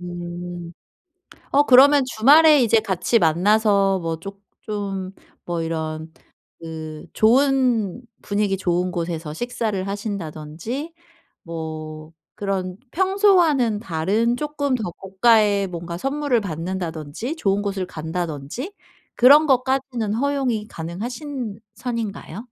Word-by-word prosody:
음. 175 Hz, 0 st, -7 dB, 0.8 s
어 285 Hz, -, +5 dB
그러면 280 Hz, +1 st, +7 dB
주말에 290 Hz, +5 st, +6 dB
이제 225 Hz, -1 st, +4 dB
같이 215 Hz, +2 st, +1 dB
만나서 195 Hz, +3 st, +3 dB
뭐 165 Hz, -2 st, -3 dB
쪼 195 Hz, +3 st, -9 dB, 0.2 s
좀 195 Hz, -3 st, -4 dB, 0.3 s
뭐 170 Hz, -1 st, -2 dB
이런 160 Hz, 0 st, -4 dB, 0.5 s
그 160 Hz, -1 st, -8 dB
좋은 245 Hz, -3 st, +2 dB, 0.2 s
분위기 200 Hz, -1 st, 0 dB
좋은 180 Hz, 0 st, 0 dB
곳에서 165 Hz, -3 st, -4 dB
식사를 220 Hz, -4 st, -2 dB
하신다든지 200 Hz, -, -5 dB, 0.5 s
뭐 155 Hz, -1 st, -7 dB, 0.2 s
그런 190 Hz, -2 st, -3 dB
평소와는 355 Hz, -, +3 dB
다른 205 Hz, +8 st, 0 dB
쪼끔 290 Hz, -2 st, -1 dB
더 215 Hz, -7 st, -2 dB
고가의 200 Hz, +1 st, +3 dB
뭔가 170 Hz, -1 st, -6 dB
선물을 275 Hz, -1 st, 0 dB
받는다든지 170 Hz, -, -4 dB
좋은 200 Hz, -9 st, +1 dB
곳을 200 Hz, -2 st, -2 dB
간다든지 160 Hz, -, -5 dB, 0.4 s
그런 290 Hz, +5 st, +7 dB
것까지는 260 Hz, -4 st, 0 dB
허용이 255 Hz, -4 st, 0 dB
가능하신 225 Hz, -, -6 dB
선인가요? 230 Hz, -6 st, -5 dB
200 Hz, 240 characters per minute, -22 LUFS, 170-250 Hz, 0.8 s, 그러면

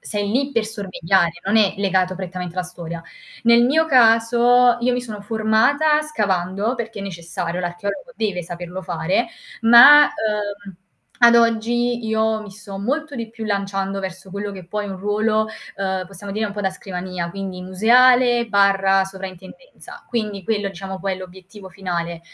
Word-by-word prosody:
sei 205 Hz, -1 st, -3 dB
lì 270 Hz, +4 st, 0 dB
per 230 Hz, -5 st, 0 dB
sorvegliare, 190 Hz, -5 st, 0 dB
non 210 Hz, +3 st, +2 dB
è 210 Hz, -3 st, +3 dB
legato 185 Hz, -2 st, 0 dB
prettamente 180 Hz, -1 st, -6 dB
alla 185 Hz, -, -1 dB
storia. 170 Hz, -2 st, -8 dB, 0.4 s
Nel 235 Hz, 0 st, +5 dB
mio 315 Hz, +5 st, +3 dB
caso, 240 Hz, -1 st, +4 dB
io 250 Hz, +1 st, +1 dB
mi 250 Hz, -, -1 dB
sono 215 Hz, -4 st, -8 dB
formata 225 Hz, +9 st, +2 dB
scavando 205 Hz, -6 st, -1 dB
perché 230 Hz, -3 st, -6 dB
necessario, 170 Hz, -1 st, -5 dB
l'archeologo 200 Hz, -, -5 dB
deve 195 Hz, -5 st, -2 dB
saperlo 175 Hz, +2 st, -7 dB
fare, 180 Hz, +5 st, -1 dB, 0.4 s
ma, 270 Hz, +6 st, +9 dB
uhm, 205 Hz, -5 st, -4 dB, 0.4 s
ad 235 Hz, -1 st, +6 dB
oggi 235 Hz, +1 st, +1 dB
io 220 Hz, 0 st, 0 dB
mi 210 Hz, -, -11 dB
so 195 Hz, 0 st, -10 dB
molto 285 Hz, +9 st, -3 dB
di 230 Hz, -3 st, -6 dB
più 225 Hz, -1 st, -8 dB
lanciando 195 Hz, -1 st, -2 dB
verso 190 Hz, 0 st, -8 dB
quello 205 Hz, +1 st, -5 dB
che 185 Hz, -3 st, -10 dB
poi 210 Hz, +2 st, -4 dB
è -, -, -6 dB
un 190 Hz, -, -7 dB
ruolo, 215 Hz, +2 st, 0 dB, 0.3 s
uhm, 190 Hz, -1 st, -2 dB
possiamo 195 Hz, +1 st, -9 dB
dire 215 Hz, 0 st, -1 dB
un 205 Hz, -, -4 dB
po' 205 Hz, -, -5 dB
da 190 Hz, -, +1 dB
scrivania, 180 Hz, -2 st, -6 dB
quindi 190 Hz, -1 st, -6 dB
museale/sovraintendenza. 200 Hz, -, +1 dB
Quindi 210 Hz, -5 st, -3 dB
quello 205 Hz, -3 st, -1 dB
diciamo 190 Hz, 0 st, -7 dB
poi 195 Hz, -1 st, -2 dB
è -, -, -9 dB
l'obiettivo 190 Hz, +1 st, -12 dB
finale, 170 Hz, -3 st, -4 dB
200 Hz, 155 wpm, -20 LUFS, 185-230 Hz, 0.4 s, ma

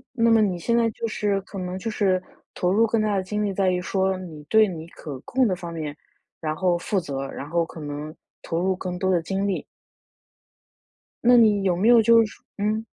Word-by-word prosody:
那 230 Hz, -1 st, +3 dB
么 225 Hz, -1 st, +5 dB
你 185 Hz, -4 st, 0 dB
现 235 Hz, +7 st, +1 dB
在 230 Hz, -1 st, +3 dB
就 230 Hz, -, -4 dB
是 205 Hz, -2 st, -1 dB
可 195 Hz, +1 st, -10 dB
能 180 Hz, 0 st, -4 dB
就 225 Hz, -, -3 dB
是 190 Hz, -4 st, +1 dB, 0.3 s
投 180 Hz, 0 st, 0 dB
入 225 Hz, +3 st, +4 dB
更 225 Hz, 0 st, +1 dB
大 210 Hz, -1 st, +1 dB
的 190 Hz, -, -1 dB
精 210 Hz, +3 st, -2 dB
力 205 Hz, -, 0 dB
在 190 Hz, -1 st, +1 dB
于 180 Hz, 0 st, -1 dB
说 190 Hz, +1 st, 0 dB
你 160 Hz, -5 st, -9 dB
对 220 Hz, +8 st, +4 dB
你 165 Hz, -3 st, -7 dB
可 145 Hz, -6 st, -8 dB
控 260 Hz, -1 st, +1 dB
的 185 Hz, -, 0 dB
方 170 Hz, -1 st, -7 dB
面， 150 Hz, -3 st, -5 dB, 0.4 s
然 155 Hz, -1 st, -2 dB
后 180 Hz, -1 st, +1 dB
负 195 Hz, +2 st, -1 dB
责， 135 Hz, -4 st, -4 dB
然 145 Hz, -, -7 dB
后 170 Hz, 0 st, +1 dB
可 165 Hz, -, -11 dB
能 150 Hz, +1 st, -6 dB, 0.3 s
投 165 Hz, +1 st, -2 dB
入 190 Hz, +1 st, +1 dB
更 180 Hz, -1 st, -5 dB
多 190 Hz, -, 0 dB
的 175 Hz, -3 st, +2 dB
精 195 Hz, +3 st, -1 dB
力。 195 Hz, -, -2 dB, 1.6 s
那 245 Hz, 0 st, +7 dB
你 210 Hz, -3 st, +4 dB
有 185 Hz, -2 st, +2 dB
没 210 Hz, +5 st, +2 dB
有 235 Hz, -1 st, +7 dB
就 230 Hz, 0 st, +6 dB
是 210 Hz, -, -12 dB, 0.2 s
嗯。 215 Hz, +2 st, -1 dB
190 Hz, 240 characters per minute, -24 LUFS, 170-215 Hz, 1.6 s, 那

